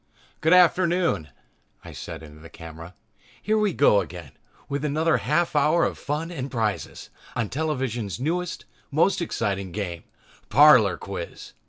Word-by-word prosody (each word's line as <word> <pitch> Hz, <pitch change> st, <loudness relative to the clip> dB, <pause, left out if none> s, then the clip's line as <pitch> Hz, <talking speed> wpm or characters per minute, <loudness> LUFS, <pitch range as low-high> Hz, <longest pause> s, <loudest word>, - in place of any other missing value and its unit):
"Good 160 Hz, +3 st, +4 dB
afternoon," 175 Hz, -, +3 dB, 0.6 s
I -, -, -9 dB
said -, -, -8 dB
into 75 Hz, 0 st, -13 dB
the 80 Hz, +1 st, -13 dB
camera, 80 Hz, +1 st, -11 dB, 0.4 s
"here 215 Hz, +1 st, +1 dB
we 210 Hz, -2 st, +2 dB
go 120 Hz, -, +4 dB
again 85 Hz, -6 st, -9 dB, 0.4 s
with 140 Hz, +1 st, -3 dB
another 155 Hz, +2 st, +1 dB
half 170 Hz, +2 st, 0 dB
hour 155 Hz, +4 st, +3 dB
of -, -, -2 dB
fun 155 Hz, +4 st, -3 dB
and 140 Hz, -5 st, -5 dB
prizes 110 Hz, -5 st, -3 dB, 0.2 s
on 115 Hz, -3 st, -1 dB
television's 130 Hz, -, -2 dB
newest, 170 Hz, +6 st, -2 dB, 0.2 s
most 165 Hz, +5 st, +2 dB
exciting, 100 Hz, -, -2 dB
game, 85 Hz, -4 st, -5 dB, 0.5 s
'Parlor 125 Hz, -6 st, +6 dB
Quiz.' -, -, -8 dB
140 Hz, 140 wpm, -24 LUFS, 100-165 Hz, 0.6 s, Parlor